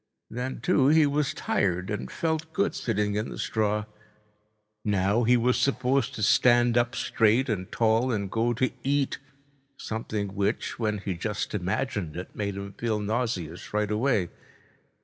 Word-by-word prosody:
Then, 125 +2 -4
too, 145 -7 +3
he 155 +1 +6
was 145 0 +1
tired 95 +1 -1
and 105 - -3
felt 160 -1 -2
good 200 +1 +1
sitting 105 -3 -1
in 105 +2 -2
the - - -7
straw. 105 -1 0 1.0
Now 100 +3 +2
he 125 +2 +5
was 125 +2 +2
supposed 135 0 +1
to 110 - -3
stand 120 +2 +4
up 120 0 +2
straight 115 +1 +2
and 95 -4 -2
tall 115 +2 +2
and 100 -4 -2
go 115 +1 +1
to 130 +2 0
eat, 140 0 0 0.6
something 110 -2 -3
which, 100 +4 -2
when 105 -2 0
he 100 -1 -3
just 105 +5 -3
imagined 95 - -2
it, 90 - -7
made 100 -2 -2
him 100 0 -6
feel 110 -2 -1
nauseous 105 -6 -3
right 105 0 +1
away. 105 -5 +1
110 Hz, 155 wpm, -27 LUFS, 100-125 Hz, 1.0 s, he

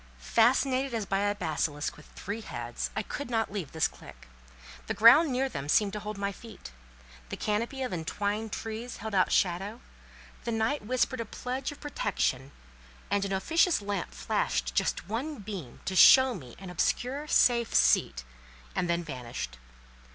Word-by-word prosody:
Fascinated 255 - +2
as 220 -3 -2
by 195 0 0
a 205 0 +1
basilisk 155 -4 -2
with 150 - -15
three 205 +3 -5
heads, 120 - -5
I 215 - -1
could 285 +4 -6
not 225 -3 0
leave 195 -8 -4
this 160 - +2
clique; - - -14 0.6
the - - -2
ground 270 +7 +7
near 260 +2 +1
them 140 - -6
seemed 200 +4 +3
to 210 - -3
hold 210 0 -6
my 200 0 -1
feet. 220 - -11 0.6
The - - -5
canopy 230 +6 -1
of 250 - -3
entwined 205 +6 -2
trees 225 +3 -5
held 220 -1 -6
out 185 -2 +3
shadow, 195 +5 0 0.6
the 235 - -2
night 225 +5 0
whispered 255 +2 0
a - - -1
pledge 255 +5 -4
of 290 - -11
protection, 145 - -2 0.6
and 200 0 +2
an 195 - -4
officious 325 - +2
lamp 200 - -3
flashed - - -1
just 65 - 0
one 265 +8 -3
beam 195 - -8
to 190 - -2
show 260 +7 +8
me 130 - -10
an 190 -2 -9
obscure, 260 - -1
safe 235 -5 +3
seat, - - +3 0.5
and 175 - 0
then 170 0 +1
vanished. 120 - -6
210 Hz, 165 wpm, -29 LUFS, 170-245 Hz, 0.6 s, show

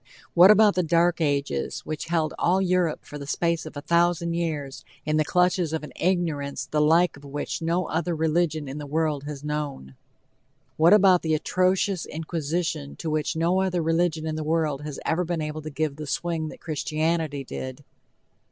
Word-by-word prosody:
What 180 +2 +8
about 210 -1 +6
the 180 - +1
dark 170 +1 +2
ages 140 - -1
which 155 -1 -5
held 165 -2 0
all 180 +2 +3
Europe 180 -4 0
for 150 - -8
the 140 - -8
space 170 +1 0
of 155 - -9
a - - -4
thousand 170 0 +2
years 155 -5 -3 0.2
in 155 0 +1
the 155 - +3
clutches 180 0 +1
of 160 - -2
an 150 - -9
ignorance 160 -7 -1
the 150 +3 0
like 165 +3 +4
of 140 - -16
which 145 +3 -4
no 170 +2 0
other 170 +1 -1
religion 155 -1 0
in 135 +3 -6
the 145 - -7
world 150 -1 -1
had 145 -1 -7
known? 150 - -4 0.8
What 165 +2 +5
about 195 -3 +6
the 160 -1 +1
atrocious 185 +3 +1
inquisition 160 - -3
to 160 - -4
which 155 +1 -1
no 170 +4 +2
other 180 -3 0
religion 165 -1 +1
in 155 -1 -2
the 155 - -3
world 155 -3 0
had 150 -1 -6
ever 165 +2 +1
been 170 -1 -2
able 155 0 -4
to 155 - -6
give 150 -1 -2
the 155 -1 -6
swing 160 +3 -2
that - - -11
Christianity 155 -1 -1
did? 130 +1 -7
160 Hz, 190 wpm, -25 LUFS, 150-175 Hz, 0.8 s, What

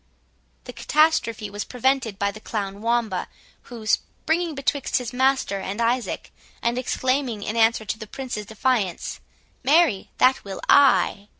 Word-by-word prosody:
The - - -9
catastrophe 300 -9 +2
was 205 0 -4
prevented 250 -4 0
by 200 -1 0
the 215 - -11
clown 200 -2 -4
Wamba, 230 -4 0 0.4
who, 235 -3 -9
springing 320 +8 -1
betwixt 275 0 0
his 250 -1 -4
master 260 -6 +1
and 195 +3 -5
Isaac, 235 +1 -1 0.3
and 235 +1 0
exclaiming, 255 -3 -1
in 215 - -3
answer 225 -1 +3
to 220 - -3
the 215 - -8
Prince's 245 -4 -6
defiance, 220 -4 -1 0.4
"Marry, 285 - +3
that 255 +1 +4
will 195 -1 -7
I!" 270 -7 +4
235 Hz, 140 wpm, -23 LUFS, 210-265 Hz, 0.4 s, that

